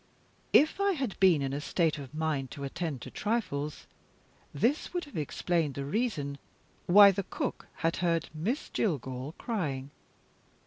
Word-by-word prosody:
If 310 +6 +5
I 400 0 +3
had 265 - -2
been 175 -7 +5
in 135 0 -2
a 145 - -2
state 160 -1 +1
of 135 -3 -8
mind 155 -4 -1
to 140 - -6
attend 150 -2 -3
to - - -8
trifles, 155 -10 -2 0.7
this 250 - 0
would 350 - -1
have 290 - -14
explained 160 0 -1
the 140 - -3
reason 145 - -1 0.5
why 200 +2 +9
the 195 +1 -2
cook - - -4 0.2
had 165 - +2
heard 170 -2 +1
Miss 205 - -2
Jillgall 135 - -2
crying. 145 - -3
165 Hz, 150 wpm, -30 LUFS, 140-210 Hz, 0.7 s, why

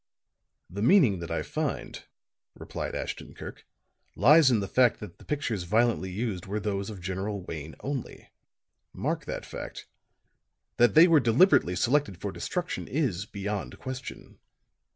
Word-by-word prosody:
"The 100 +3 -6
meaning 120 - +5
that 85 - -6
I - - -2
find," - - -4 0.5
replied - - -5
Ashton - - -5
Kirk, - - -10 0.5
"lies 150 +1 +6
in 120 -4 +3
the 100 - -3
fact 125 +3 +3
that 105 - -10
the - - -14
pictures 140 -9 -2
violently 110 +1 +1
used 95 -2 -3
were 105 +2 -2
those 100 -1 -2
of 100 -4 -8
General 95 +2 -3
Wayne 80 -3 -7
only. 135 -2 -6 0.6
Mark - - -2
that - - -5
fact. - - -8 0.9
That 120 +3 +4
they 165 +3 +9
were 165 -3 +6
deliberately 120 - +4
selected 120 -4 +1
for 100 +2 -4
destruction 175 - -4
is 110 - -1
beyond 105 0 -4
question." 130 0 -8
105 Hz, 145 wpm, -28 LUFS, 95-130 Hz, 0.9 s, they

